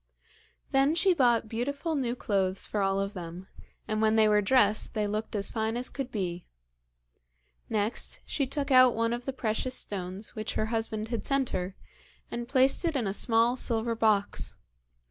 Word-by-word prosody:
Then 275 +3 +3
she 375 +2 +4
bought 240 -7 +3
beautiful 280 +8 -3
new 250 -5 -1
clothes 195 -5 0
for 210 - -1
all 195 0 +1
of 195 +1 -2
them, 175 -1 -7 0.4
and 215 -1 -1
when 220 0 +3
they 220 -1 +5
were 210 0 +4
dressed 215 -1 +2
they 210 -1 +1
looked 215 +2 -3
as 200 -1 -1
fine 220 0 -1
as 250 - -2
could 270 -2 -5
be. 180 -4 -4 1.2
Next, 215 +1 -1
she 275 -3 -1
took 280 +1 -3
out 255 -2 +7
one 230 +1 0
of 240 +1 -5
the 270 - -1
precious 255 0 -2
stones 190 0 -3
which 215 -1 -4
her 215 - +1
husband 220 -1 -2
had 235 -2 -3
sent 275 -2 0
her, 185 +1 -3 0.6
and 240 0 -5
placed 265 +3 +3
it 330 -3 0
in 250 -5 0
a 195 - -1
small 230 +2 +3
silver 230 -2 -1
box. 215 -3 0
225 Hz, 180 wpm, -28 LUFS, 205-255 Hz, 1.2 s, out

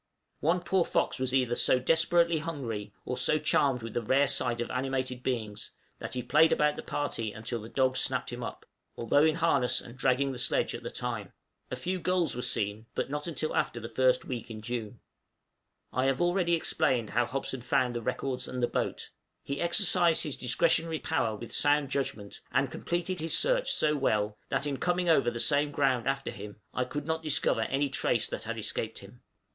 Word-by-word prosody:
One 170 +4 +1
poor 180 +1 +2
fox - - 0
was 130 -1 -1
either 125 -2 +2
so 125 - +4
desperately 165 +4 +3
hungry, 120 -10 -5
or 125 - -2
so 155 - +4
charmed 135 -5 +2
with 115 - -6
the 120 - -1
rare 130 +5 +3
sight 120 -3 0
of 120 - -3
animated 130 -1 -2
beings, 110 -5 -3 0.3
that - - -5
he 125 - -2
played 160 +2 +4
about 150 0 +2
the - - -6
party 115 -7 -3
until 110 +2 -5
the 110 - -9
dogs 130 0 +1
snapped - - -1
him - - -6
up, - - -7 0.3
although 145 +5 +3
in 160 0 +3
harness 165 -7 +2
and 120 - -11
dragging 135 +1 +1
the 125 - -6
sledge - - +2
at - - -6
the - - -5
time. - - -5 0.4
A - - -3
few 180 +9 -3
gulls 180 -3 +1
were 125 - -3
seen, 105 0 -1
but - - -2
not 150 +2 -2
until 155 -1 -2
after 120 - 0
the 115 - -6
first 130 +2 +2
week 120 -3 -5
in 110 -1 -8
June. 115 -2 -4 0.9
I 130 +1 +1
have 135 -1 +1
already 175 -1 +2
explained 125 -8 0
how 120 +1 +1
Hobson 135 -1 -4
found 125 0 +1
the 120 - -3
records 130 +3 -3
and 125 -1 -4
the - - +4
boat: - - -3 0.3
he 140 0 -4
exercised 170 -2 +3
his 150 -5 -2
discretionary 160 +6 +1
power 135 -9 -1
with 115 +2 -8
sound 145 -1 +2
judgment, 110 -7 -3
and 135 -1 +1
completed 175 +4 -2
his 160 0 +2
search - - +2
so 150 0 +2
well, 105 -6 0
that, - - 0
in 140 -2 -2
coming 180 +2 0
over 135 -7 +4
the 120 0 -5
same 145 +3 +3
ground 135 -4 +1
after 135 0 -1
him, 105 +1 -9
I 125 - 0
could 145 +3 -5
not 160 0 -1
discover 155 -7 +1
any 135 +5 0
trace 120 -4 +1
that - - -5
had 115 +1 -4
escaped 110 +1 -3
him. 100 +5 -13
130 Hz, 200 wpm, -29 LUFS, 120-155 Hz, 0.9 s, so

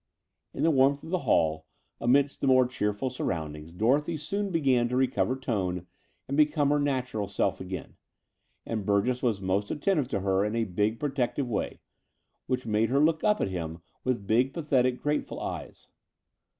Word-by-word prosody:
In - - -3
the 165 - +4
warmth 140 0 +3
of 160 - -8
the 185 - +1
hall 80 -1 +2 0.3
amidst 135 +4 +2
the 140 - +1
more 130 -1 +6
cheerful 125 -1 -2
surroundings 80 -9 -4
Dorothy 140 - +1
soon 200 +7 -2
began 135 -8 +2
to 125 - -1
recover 130 0 +1
tone 95 -9 -2 0.4
and 140 - -2
become 150 -1 +3
her 145 - +3
natural 130 -7 -1
self 95 -1 -1
again: 95 -2 -7 0.7
and 110 -2 -3
Burgess 105 +6 +1
was 115 -6 0
most 95 +2 0
attentive 150 -3 0
to 100 - -2
her 95 0 +2
in 105 +2 -1
a 115 - +1
big 105 +3 -1
protective 135 -2 -1
way, 115 - -3 0.7
which 130 -1 -1
made 110 0 +1
her 135 +2 +2
look 160 +1 +2
up 210 0 +3
at - - 0
him 85 -2 -5 0.2
with 120 -6 -1
big, 125 +6 +2
pathetic, 130 -6 +1
grateful 150 0 -1
eyes. - - -6
125 Hz, 170 wpm, -28 LUFS, 100-140 Hz, 0.7 s, more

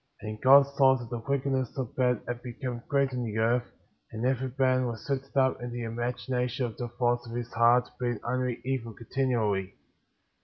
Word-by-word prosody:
22. - - -7
And 110 - -9
God 140 +1 +6
saw 135 -1 +6
that 120 -1 -9
the 120 -1 -3
wickedness 135 -2 -1
of 130 -4 -4
men 125 -3 +2
had 120 0 -4
become 120 0 -5
great 140 -1 +2
in 125 -1 -2
the 110 -2 -3
earth; 120 +2 +2 0.4
and 110 +2 -3
every 130 0 0
man 130 -1 +3
was 115 -2 -6
lifted 135 0 -3
up 130 -1 +3
in 120 - -4
the 120 0 -4
imagination 125 +2 -2
of 115 - -5
the 120 - -3
thoughts 120 0 0
of 115 - -6
his 120 -1 -5
heart, 120 +2 +4
being 120 -3 -1
only 125 0 -1
evil 125 -4 -2
continually. 110 -6 -1
125 Hz, 195 wpm, -28 LUFS, 120-130 Hz, 0.4 s, God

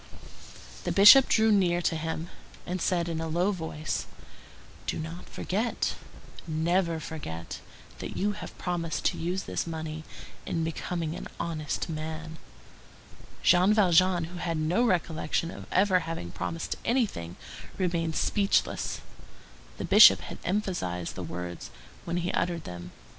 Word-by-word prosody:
The - - -1
Bishop 210 +7 +9
drew 220 0 +4
near 180 -4 +3
to 165 - +1
him, 160 +1 -3 0.4
and 180 0 -3
said 175 -2 +1
in 165 -1 -2
a 165 - -2
low 175 +5 +1
voice:— 160 -4 -4 0.8
"Do - - -1
not 165 +3 -7
forget, 220 +6 -1 0.5
never 170 +1 +1
forget, 115 - -6 0.4
that - - -6
you 205 +2 +1
have 205 - -8
promised 170 -2 -3
to - - +2
use 180 +3 -2
this - - -3
money 160 -1 -5 0.4
in 165 - -2
becoming 165 0 -3
an - - -6
honest 160 -3 -2
man." 160 0 -5 1.0
Jean 185 +4 +5
Valjean, 185 -3 +4
who 175 +2 -7
had 165 -2 -2
no 160 +9 +2
recollection 170 -5 0
of - - -10
ever 185 0 +4
having 165 - -5
promised 165 - -4
anything, 205 - 0 0.4
remained 170 -3 0
speechless. 200 -2 +1 0.8
The - - -3
Bishop - - +8
had - - -8
emphasized 175 - -2
the 95 - -6
words 90 0 -6 0.4
when 170 +1 -2
he 175 +1 -1
uttered 170 -2 -1
them. 90 0 -8
170 Hz, 135 wpm, -28 LUFS, 160-185 Hz, 1.0 s, Bishop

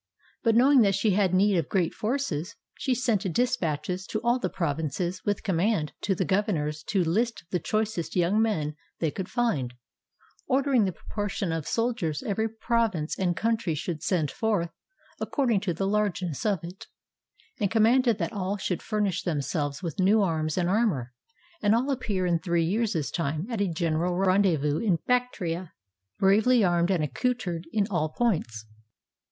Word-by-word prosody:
But 230 -1 +3
know 255 +4 +6
ing 275 -4 +7
that 200 -3 +4
she 205 +2 +2
had 190 -1 +2
need 195 +1 +3
of 165 -3 -1
great 180 -4 +1
forces, 220 - -2 0.2
she 260 -2 -1
sent 215 -6 0
dispatches 185 - -1
to 215 - -2
all 240 +2 +2
the 185 - -1
provinces 165 +2 -2
with 205 0 -1
command 185 -3 0
to 195 - 0
the 185 - -1
governors 165 -6 0
to 195 -3 +2
list 225 +8 0
the 180 - +1
choicest 215 -1 -2
young 185 +4 +3
men 155 -10 0 0.2
they 160 -3 0
could 190 +2 -5
find, 150 - -1 0.7
ordering 265 -4 +3
the 190 - 0
proportion 200 0 -4
of 165 -2 -3
soldiers 230 -11 -1
every 220 +2 -1
province 220 -8 0
and 180 -3 0
country 225 -7 0
should 155 0 -4
send 160 -5 0
forth, 205 -7 0 0.5
according 245 -8 +1
to 195 -2 -2
the 175 +4 -2
largeness 195 -5 -1
of 195 -6 +1
it; 175 +3 -9 0.7
and 200 - +1
commanded 230 +1 +4
that 170 -5 -3
all 200 0 -2
should 185 -2 -2
furnish 210 -4 -1
themselves 145 -1 -2
with 165 -1 -4
new 200 +3 +4
arms 155 -3 -1
and 175 -1 +1
armor, 180 - +1 0.5
and 205 +2 +4
all 260 +5 +1
appear 210 -8 -1
in 170 -2 +2
three 170 -1 +1
years' 200 -4 0
time 155 0 -2
at 225 -3 -1
a 200 - +2
general 165 +1 0
rendezvous 180 -6 +2
in 195 -7 +2
Bactria, 185 -9 -1 0.4
bravely 215 +5 +4
armed 175 -1 +2
and 180 -5 +1
accoutered 175 - -2
in 210 -2 +1
all 155 -4 0
points. 155 - -1
190 Hz, 165 wpm, -27 LUFS, 165-220 Hz, 0.7 s, ing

